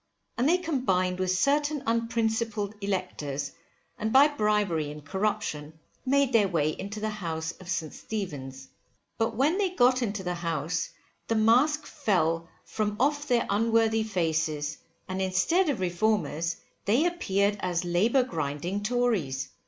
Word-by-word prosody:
And 250 +5 +2
they 350 - +5
combined 190 - 0
with 185 -1 0
certain 290 +9 +1
unprincipled 225 -2 0
electors, 150 -8 -3 0.5
and 220 +1 -1
by 275 +4 +7
bribery 210 - +1
and 150 0 -9
corruption 175 -4 -2 0.3
made 275 0 +3
their 215 -3 +5
way 160 -5 +1
into 200 +6 -6
the 215 0 -2
house 165 -5 -3
of 185 -2 -11
St. 160 -4 -2
Stephen's. 135 -11 -6 0.5
But 225 0 0
when 300 - +2
they 395 -2 +2
got 255 -6 +3
into 205 -4 -2
the 180 -1 -2
house, 165 -2 -2 0.4
the 225 - +1
mask 255 +8 +4
fell 170 - 0 0.2
from 210 -1 -2
off 290 +3 +1
their 245 -3 +2
unworthy 225 +1 +2
faces, 160 -7 -1 0.3
and 185 0 -3
instead 190 - +2
of 265 -8 -1
Reformers, 175 -3 0 0.3
they 235 +11 +3
appeared 205 - +1
as 180 -1 -1
labour 215 +10 +3
grinding 165 - -3
Tories. 205 - 0
205 Hz, 140 wpm, -28 LUFS, 170-240 Hz, 0.5 s, by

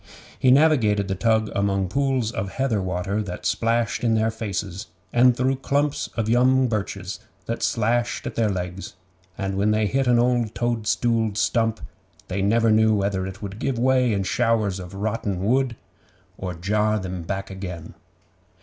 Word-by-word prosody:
He 130 - +4
navigated 125 -8 +4
the 95 - -1
tug 110 +2 +1
among 100 -1 0
pools 130 0 0
of 100 -4 -4
heather 130 -6 0
water 95 +3 -2
that 90 -4 -6
splashed 115 +1 0
in 115 -2 +3
their 110 0 +1
faces, 100 -2 -4 0.3
and 120 0 +5
through 130 +1 +1
clumps 140 +2 0
of 115 -2 0
young 130 +3 +4
birches 100 -3 -3 0.3
that 115 - -3
slashed 120 +2 0
at - - -4
their 115 -2 +1
legs, 90 -1 -5 0.4
and 95 0 -2
when 100 +2 +2
they 105 0 +2
hit 135 +5 0
an 120 -1 +4
old 120 -2 +1
toadstooled 115 -2 0
stump, 115 -1 +1 0.5
they 95 +2 -2
never 115 +3 +3
knew 110 0 +4
whether 100 -2 -1
it 95 +2 -9
would 100 +1 -6
give 135 -1 -1
way 125 0 +3
in 100 -2 0
showers 110 -1 +1
of 90 +1 -9
rotten 105 -2 -2
wood, 130 +1 +1 0.6
or 90 -2 -5
jar 105 +5 +1
them 95 -2 -5
back 95 +3 -4
again. 90 -4 -7
110 Hz, 165 wpm, -23 LUFS, 100-120 Hz, 0.6 s, and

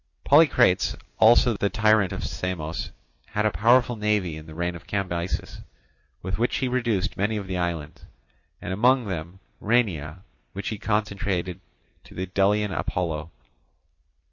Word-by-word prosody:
Polycrates 125 - +4 0.2
also, 115 +1 +6
the 100 0 0
tyrant 110 -3 +3
of - - -5
Samos, 85 -3 -4 0.4
had 105 0 -1
a 110 - +3
powerful 120 +3 +3
navy 105 -6 0
in 80 0 -10
the 80 - -10
reign 85 +1 -2
of 85 - -12
Cambyses, 90 -3 -3 0.6
with 95 +3 -3
which 120 - +1
he 130 - 0
reduced 120 -7 -1
many 105 +3 0
of 100 - -4
the 95 -1 -3
islands, 80 -3 -4 0.5
and 95 - -4
among 125 +5 +3
them 90 -1 -5 0.2
Rhenea, 95 -8 0 0.3
which 100 +1 -4
he 110 - -5
consecrated 100 -4 -1 0.5
to - - -15
the 95 - -3
Delian 100 +2 +1
Apollo. 80 -1 -2
100 Hz, 140 wpm, -25 LUFS, 85-110 Hz, 0.6 s, also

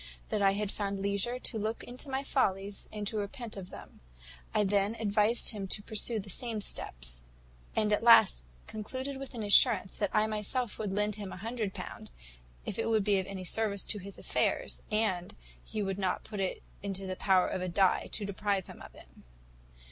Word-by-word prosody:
That 215 -2 0
I 195 -1 +5
had 205 0 -1
found 200 -1 -2
leisure 200 +5 0
to 240 -3 -2
look 220 +2 -2
into 250 +3 -8
my 265 +1 -1
follies 200 -7 0
and 210 -1 -4
to 215 +1 -1
repent 210 +3 -5
of 190 -2 -7
them. - - -12 0.5
I 210 - +2
then 200 +2 +2
advised 215 +1 +4
him 200 -3 -4
to 205 +2 0
pursue 220 +2 +3
the 200 - -7
same 230 +1 -1
steps; - - -3 0.5
and 210 -1 +3
at - - +2
last 225 - +7 0.2
concluded 260 +6 -5
with 270 -1 -7
an 225 - -3
assurance 205 -1 +5
that 205 - 0
I 215 0 +3
myself 215 +2 -2
would 210 -3 -2
lend 210 +1 0
him 205 -2 -6
a - - -7
hundred 220 0 -3
pound, - - -7 0.6
if - - -3
it - - 0
would 220 -2 +3
be 200 -1 +3
of 190 - -4
any 195 -2 -6
service 200 +1 0
to 210 - 0
his 195 +1 -9
affairs, - - 0
and 210 -5 0 0.3
he 215 - -3
would 195 0 -2
not 185 -2 0
put 210 -2 -6
it 190 -1 -2 0.2
into 195 -1 -3
the 185 0 -3
power 185 -1 +3
of 185 - -3
a 185 - -2
die 190 +1 +2
to 210 - -1
deprive 200 -1 -1
him - - -12
of - - -12
it. - - -14
205 Hz, 200 wpm, -31 LUFS, 195-220 Hz, 0.6 s, last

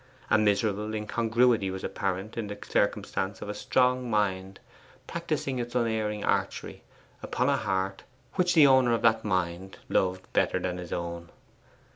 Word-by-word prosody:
A - - +6
miserable 105 +1 +1
incongruity 115 0 +2
was 95 0 -5
apparent 95 +2 -3
in 115 -3 -3
the 105 0 -6
circumstance 100 -1 -1
of - - -7
a - - -2
strong 125 +2 +1
mind 95 -3 -1 0.5
practising 155 -6 -3
its 120 0 -5
unerring 110 -3 0
archery - - -1 0.4
upon 125 +2 0
a 140 - +3
heart 95 -3 -2 0.3
which 180 -2 +2
the 155 -3 +8
owner 130 -3 +5
of 115 - -1
that 110 -1 +4
mind 95 -1 -2
loved 95 0 0
better - - +2
than 90 -1 -3
his 90 -1 -8
own. 85 0 -4
105 Hz, 150 wpm, -28 LUFS, 95-120 Hz, 0.5 s, the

